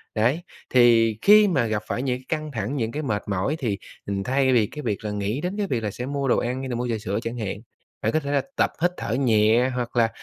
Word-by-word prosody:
Đấy, 120 +9 +2 0.3
thì 115 -3 +5
khi 210 +1 +7
mà 145 -11 +2
gặp 110 -1 -2
phải - - -2
những 125 -2 0
cái 130 - -19
căng 155 -1 -2
thẳng, 115 +2 -3
những 115 -4 -1
cái 150 +5 -4
mệt 105 -7 -1
mỏi 100 +8 0
thì, 110 -7 -1 0.3
ừm, 100 -1 -2
thay 130 +3 +2
vì 115 -4 +4
cái 150 - -8
việc 110 -5 -3
là 105 - -2
nghĩ 105 +6 -2
đến 180 +4 -3
cái 205 -1 -1
việc 120 -9 -1
là 105 - -1
sẽ 125 - -5
mua 140 0 -2
đồ - - +3
ăn 125 +2 -2
hay 135 0 -5
là 120 - -2
mua 120 +1 -2
trà 115 - 0
sữa 100 0 -2
chẳng 115 +1 -4
hạn, 105 -4 -3 0.4
bạn 110 - +1
có 155 - +2
thể 140 -2 -4
là 145 - +2
tập - - +2
hít 175 +1 +3
thở - - -3
nhẹ 115 -1 +3
hoặc 120 -1 -3
là, 115 -2 +4
120 Hz, 275 wpm, -24 LUFS, 110-140 Hz, 0.4 s, khi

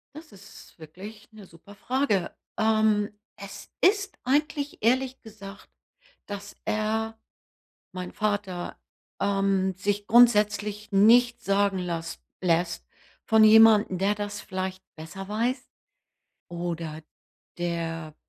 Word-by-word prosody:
Das 310 -6 -12
ist 195 -2 -15
wirklich 195 +8 -11
'ne 210 -3 -13
super 170 +5 -16
Frage. 245 -5 -1 0.2
Ähm, 215 -1 +2 0.3
es 200 0 -10
ist 400 0 +2
eigentlich 290 +2 0
ehrlich 260 +3 +1
gesagt, 205 -3 -12 0.6
dass 205 -1 -8
er, 220 +1 -2 0.8
mein 180 -1 -6
Vater, 205 -4 -3 0.4
ähm, 195 -1 +1
sich 205 +2 -2
grundsätzlich 210 -2 +3
nichts 240 +4 +4
sagen 200 -1 +1
lasst 165 -2 -5 0.2
lässt 170 -1 0 0.4
von 220 0 +5
jemandem, 215 -3 +6
der 200 +2 +1
das 205 0 -5
vielleicht 185 -1 -5
besser 165 +5 -9
weiß 240 +5 -1 0.9
oder 170 -2 -5 0.6
der 165 -2 -4
205 Hz, 105 wpm, -26 LUFS, 185-220 Hz, 0.9 s, jemandem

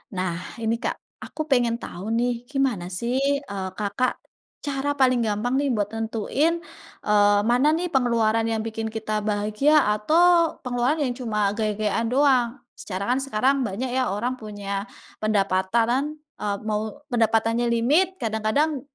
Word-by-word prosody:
Nah, 180 +1 -4
ini 230 +1 -1
Kak, - - -2 0.2
aku 310 - -6
pengen 240 -5 +2
tahu 205 -3 -7
nih 240 0 0
gimana 260 -11 -1
sih, 235 +8 -2 0.3
eee, 195 -2 -4
Kakak, 210 +5 -1 0.5
cara 280 0 -2
paling 255 -2 +4
gampang 215 +4 -1
nih 280 +1 +1
buat 205 0 -2
nentuin, 225 +8 0 0.5
eee, 205 -1 +4
mana 245 +5 +3
nih 355 +1 -1
pengeluaran 230 -3 +2
yang 225 -1 -1
bikin 225 0 -3
kita 215 -1 -3
bahagia 210 +7 +1 0.2
atau 335 +9 +3
pengeluaran 250 +4 +1
yang 250 - -1
cuma 210 -4 0
gaya-gayaan 215 +1 0
doang. 260 -2 +3 0.2
Secara 190 -1 -5
kan 260 - 0
sekarang 270 +1 +1
banyak 240 +2 -2
ya 260 -1 +1
orang 230 +6 -1
punya 200 -1 -5 0.3
pendapatan, 215 +8 +1 0.2
eee, 205 -1 -1
mau 210 -1 0 0.3
pendapatannya 230 +1 +2
limit 300 +12 +2
kadang-kadang, 235 +6 0
230 Hz, 140 wpm, -24 LUFS, 210-260 Hz, 0.5 s, paling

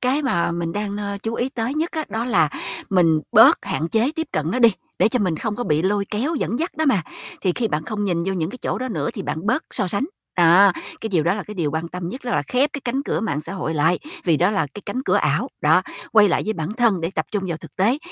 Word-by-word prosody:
Cái 260 +4 +1
mà 170 -11 +1
mình 170 -1 -3
đang, 205 0 -3
ơ, 200 -1 -3
chú 225 0 -2
ý 245 +2 -1
tới 245 0 -3
nhất 320 +3 -1
á, 315 -2 -3
đó 225 +1 -2
là 185 -11 +3 0.4
mình 165 -5 +4
bớt - - +7
hạn 160 +2 -2
chế 225 +7 +2
tiếp 320 -1 -2
cận 155 +1 -1
nó 225 - 0
đi, 235 -4 +6 0.3
để - - +5
cho 250 - 0
mình 185 -7 0
không 210 +4 -3
có 245 - -3
bị 155 0 +1
lôi 200 +2 +1
kéo 250 +10 -1
dẫn 250 -4 -1
dắt 335 +4 -3
đó 315 - +1
mà. 210 -10 +3 0.4
Thì 185 - +1
khi 230 -3 0
bạn 155 -4 -2
không 210 +1 -3
nhìn 175 -4 0
vô 195 - -1
những 170 -2 -2
cái 255 - -9
chỗ - - -2
đó 255 - -3
nữa 155 - -2
thì - - -4
bạn 160 +5 -4
bớt 255 +8 +1
so 195 - 0
sánh. 200 +8 +1 0.3
Đó, 180 +3 +6 0.3
cái 225 - -3
điều 180 -7 +2
đó 175 +3 +2
là 205 - -4
cái 210 - -9
điều 165 -6 -1
quan 160 +2 -3
tâm 180 0 -5
nhất 255 +9 -6
đó 245 - -3
là 145 - +1
khép 255 - +1
cái 280 - -4
cánh 255 +3 -1
cửa - - -1
mạng 150 -9 -1
xã 155 - -7
hội 165 -4 -3
lại. 160 +4 +2 0.3
Vì 165 -4 +3
đó 180 +5 +3
là 165 -8 0
cái 205 - -8
cánh 250 +6 -3
cửa - - +2
ảo. - - +1
Đó, - - +4 0.3
quay 215 -2 +6
lại - - +1
với 220 - 0
bản 165 -1 -4
thân 225 -6 +2
để 165 +1 -2
tập - - -1
trung 205 -2 -1
vào 170 - -2
thực 160 -1 -14
tế, 225 +9 +2
200 Hz, 290 wpm, -22 LUFS, 170-240 Hz, 0.4 s, bớt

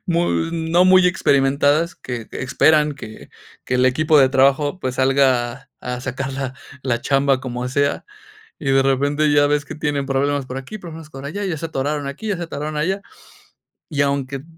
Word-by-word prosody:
mu 170 -1 +1 0.3
no 165 +2 +2
muy 185 -1 +6
experimentadas, 145 0 +2
que 120 -3 -7
que - - -6
esperan 150 +3 +3
que 110 -4 -10 0.4
que 125 - -2
el 125 +1 +3
equipo 155 +4 +3
de 135 -1 +6
trabajo, 140 +6 +2
pues, 130 -1 -3
salga 130 -1 +1
a 125 0 -4
sacar 130 +1 -4
la 135 -1 -4 0.3
la 120 -3 -1
chamba 135 0 +2
como 125 -1 -4
sea. 140 +2 0 0.6
Y 140 - -3
de 135 0 +4
repente 145 +3 +1
ya 145 0 +4
ves 145 0 0
que 160 - -7
tienen 145 -2 -2
problemas 140 0 0
por 130 +1 -6
aquí, 135 +11 -7
problemas 165 -4 -10
por 135 -1 -9
allá, 200 +8 -4
ya 170 -5 -2
se 165 - -5
atoraron 145 -1 -2
aquí, 145 +11 -6
ya 200 -4 -1
se 175 - -4
atoraron 155 -2 -5
allá. 190 +6 -1 0.9
Y 145 -4 0
aunque 140 0 -2
140 Hz, 185 wpm, -20 LUFS, 135-155 Hz, 0.9 s, muy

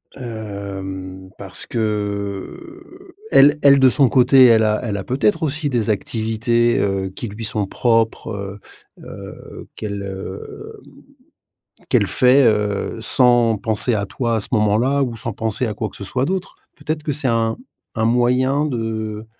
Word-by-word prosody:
Hem, 95 -5 -7
parce 95 -2 -7
que, 110 - -5 0.2
elle 145 +2 +6
elle 140 -1 +7
de 130 - +6
son 135 0 +3
côté 130 +2 +6
elle 115 -2 +5
a 105 0 +1
elle 105 -4 -3
a 100 - -5
peut-être 120 -3 0
aussi 155 -1 -1
des 120 -5 -1
activités, 115 +2 0
heu, 95 -1 -1
qui 95 +5 -7
lui 105 +2 -8
sont 105 -1 -1
propres, 115 +2 0
heu, 100 -1 -6 0.4
heu, - - -11
qu'elle, 100 -2 -5
heu, 95 -1 -8 0.9
mmh, - - -30
qu'elle - - +2
fait, 130 +2 +4
heu, 105 -1 0
sans 120 -1 +3
penser 110 +3 +1
à 100 -1 -1
toi 120 +2 -2
à - - +1
ce - - -1
moment-là 120 +5 +2
ou 120 -3 -3
sans 115 +1 -4
penser 110 +3 -2
à 105 - -3
quoi 110 - -3
que - - -16
ce - - -8
soit 125 +7 -2
d'autre. 185 +2 -4 0.2
Peut-être 155 0 -4
que 150 - -2
c'est 135 -3 -1
un 115 -1 +1 0.4
un 110 -1 0
moyen 125 +4 +2
de 110 -4 -4
115 Hz, 160 wpm, -20 LUFS, 105-130 Hz, 0.9 s, elle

